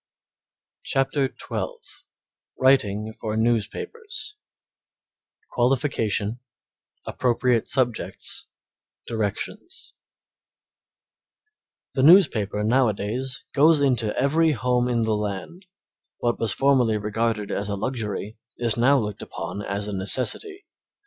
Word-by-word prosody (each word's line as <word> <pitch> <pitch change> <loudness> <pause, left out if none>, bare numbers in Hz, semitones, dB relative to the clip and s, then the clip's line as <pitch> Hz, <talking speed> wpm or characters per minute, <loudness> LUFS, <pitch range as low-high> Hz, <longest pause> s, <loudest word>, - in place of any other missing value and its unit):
CHAPTER 135 +1 +1
XII - - -4 0.9
WRITING 110 -5 +2
FOR 110 -1 -4
NEWSPAPERS 120 - -2 1.2
Qualification 120 -4 0 0.7
Appropriate 125 -1 +1
Subjects 125 -3 -1 0.6
Directions 115 - -4 2.0
The 135 - 0
newspaper 130 - +5
nowadays 125 - 0
goes 155 +2 +5
into 125 -6 +1
every 155 +4 +3
home 125 0 +1
in 120 -2 +1
the 110 -1 +1
land; 105 - -5 0.5
what 120 -1 -1
was 115 - +3
formerly 130 -5 +3
regarded 105 0 -1
as 100 +1 -2
a 100 - -1
luxury 110 -1 -4 0.2
is 120 -2 0
now 135 +4 +5
looked 105 -5 -3
upon 85 +4 -6
as 100 0 -3
a 105 - -4
necessity. 130 - -1
120 Hz, 95 wpm, -24 LUFS, 105-135 Hz, 2.0 s, newspaper